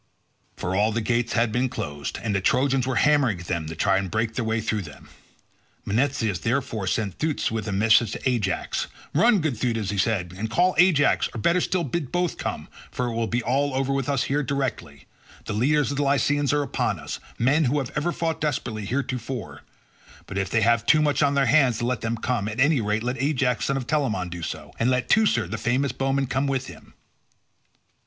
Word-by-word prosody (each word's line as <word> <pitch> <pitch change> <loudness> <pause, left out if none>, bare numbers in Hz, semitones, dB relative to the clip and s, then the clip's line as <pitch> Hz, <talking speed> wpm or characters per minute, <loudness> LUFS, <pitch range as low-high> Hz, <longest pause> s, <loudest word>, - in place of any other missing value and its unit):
For 95 - -2
all 105 +3 +2
the 115 - -1
gates 120 +1 0
had 115 -1 +2
been 125 +3 0
closed, 75 -9 -5
and 110 -3 -1
the 100 - 0
Trojans 130 +4 +2
were 130 - -1
hammering 135 -7 +3
at - - -10
them 85 -3 -2
to 80 - -6
try 95 +4 +2
and 95 -1 -4
break 110 +2 -1
their 120 - -2
way 110 0 0
through 110 -1 -1
them. 75 -6 -12 0.8
Menestheus, 115 -4 0
therefore, 115 - -2
sent 100 0 -2
Thootes 155 -6 -1
with 110 -2 -3
a - - -2
message 110 +2 +3
to - - -6
Ajax. 110 -8 -1 0.3
"Run, 210 +5 +4
good 155 -5 -1
Thootes," 115 -5 -1
he 100 - -2
said, 95 -4 0
"and 110 +4 -4
call 180 +6 +2
Ajax, 175 -5 +4
or - - -3
better 170 - +2
still 185 0 0
bid 145 -1 -3
both 175 -1 -1
come, - - -4 0.2
for 125 -1 -2
it - - -4
will 115 0 -1
be 120 +1 -1
all 140 +3 0
over 135 +1 0
with 135 -1 -1
us 140 -3 +1
here 145 +2 0
directly; 130 - -3 0.4
the 110 - -3
leaders 145 +7 +2
of 140 - -3
the 145 - +1
Lycians 145 +1 +2
are 145 0 +1
upon 135 - -1
us, - - -6 0.2
men 145 +6 +3
who 135 +4 +1
have 135 -2 -2
ever 150 +3 0
fought 165 -1 -2
desperately 120 -8 -2
heretofore. 125 -1 -4 0.6
But 100 - -4
if 95 -1 -2
they 110 - +1
have 115 0 +3
too 155 0 +5
much 145 0 +1
on 140 -1 +3
their 140 -1 +3
hands 130 -3 +4
to 120 - -2
let 125 -2 -1
them 115 +1 -2
come, 115 -3 -1
at 110 +3 -5
any 140 -1 +4
rate 105 +1 -1
let 125 0 -2
Ajax 135 -4 +1
son 135 - 0
of 130 - -4
Telamon 115 - -1
do 85 0 -7
so, 75 -2 -6
and 115 - +2
let 125 -1 0
Teucer, 200 - +3
the 110 +5 -5
famous 130 +3 0
bowman, 135 0 0
come 135 +2 -1
with 135 -1 -1
him." - - -13
125 Hz, 220 wpm, -24 LUFS, 110-140 Hz, 0.8 s, too